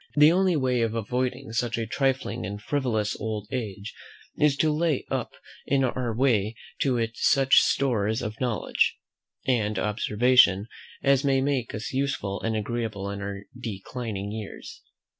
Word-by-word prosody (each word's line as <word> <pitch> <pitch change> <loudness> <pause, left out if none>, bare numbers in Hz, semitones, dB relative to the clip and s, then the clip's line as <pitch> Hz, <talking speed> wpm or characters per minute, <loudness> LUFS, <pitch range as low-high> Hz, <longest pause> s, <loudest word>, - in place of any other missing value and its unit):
The 150 +1 +7
only 185 0 +3
way 130 -4 +1
of 115 -1 0
avoiding 125 +3 -2
such 115 +1 -1
a 115 - -1
trifling 135 -2 -1
and 100 +2 -5
frivolous 110 -4 -1
old 105 -1 -4
age 105 -5 -4 0.4
is 145 -2 +3
to 155 +1 +3
lay 155 -3 0
up - - -2 0.3
in 135 -1 +2
our 125 -1 -1
way 115 -3 +1 0.2
to 130 -3 +2
it 115 -1 0
such 135 +2 +5
stores 110 -4 +1
of 110 +1 -5
knowledge 120 -4 +1 0.5
and 110 -5 +1
observation 105 -1 +3 0.4
as 140 0 +4
may 135 -1 +3
make 130 -4 -1
us 105 +4 -5
useful 130 -8 -1
and 110 -1 -1
agreeable 110 -2 -3
in 100 0 -5
our 100 0 -5
declining 110 -2 -5
years. 110 -2 -8
120 Hz, 150 wpm, -26 LUFS, 105-135 Hz, 0.5 s, The